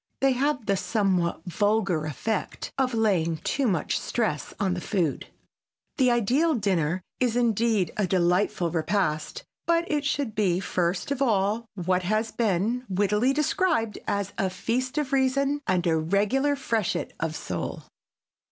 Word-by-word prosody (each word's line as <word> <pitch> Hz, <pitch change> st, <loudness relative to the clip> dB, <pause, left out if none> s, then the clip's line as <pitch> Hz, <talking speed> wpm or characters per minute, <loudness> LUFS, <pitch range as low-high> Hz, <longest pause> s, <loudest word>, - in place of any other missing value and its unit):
They 270 Hz, 0 st, +4 dB
have 270 Hz, -1 st, 0 dB
the 200 Hz, -1 st, +1 dB
somewhat 185 Hz, -6 st, 0 dB
vulgar 195 Hz, -3 st, +1 dB
effect 205 Hz, +9 st, -3 dB
of 260 Hz, -3 st, 0 dB
laying 180 Hz, -8 st, +2 dB
too 270 Hz, -, -1 dB
much 185 Hz, -7 st, 0 dB
stress 215 Hz, -11 st, -2 dB
on 195 Hz, -3 st, +1 dB
the 180 Hz, -, -4 dB
food. 170 Hz, -9 st, -1 dB, 0.7 s
The 255 Hz, -2 st, +4 dB
ideal 255 Hz, +8 st, +2 dB
dinner 185 Hz, -5 st, 0 dB, 0.2 s
is, 245 Hz, -2 st, +1 dB
indeed, 225 Hz, -5 st, +2 dB
a 205 Hz, -3 st, +1 dB
delightful 180 Hz, 0 st, +1 dB
repast, 170 Hz, -, -1 dB, 0.2 s
but 335 Hz, 0 st, +3 dB
it 295 Hz, -1 st, +1 dB
should 285 Hz, -5 st, -1 dB
be 190 Hz, -4 st, +1 dB
first 180 Hz, +3 st, -1 dB
of 280 Hz, -1 st, -2 dB
all 220 Hz, -1 st, +1 dB
what 185 Hz, 0 st, 0 dB
has 215 Hz, +4 st, 0 dB
been 225 Hz, +3 st, 0 dB
wittily 210 Hz, +6 st, +2 dB
described 300 Hz, -, +1 dB
as 200 Hz, -1 st, -1 dB
"a 195 Hz, -3 st, +1 dB
feast 245 Hz, +9 st, -2 dB
of 290 Hz, -3 st, -1 dB
reason 275 Hz, +2 st, +2 dB
and 180 Hz, -1 st, +1 dB
a 165 Hz, -2 st, +3 dB
regular 210 Hz, -, +1 dB
freshet 230 Hz, -8 st, -1 dB
of 160 Hz, -1 st, -2 dB
soul." -, -, -4 dB
210 Hz, 145 wpm, -26 LUFS, 180-255 Hz, 0.7 s, They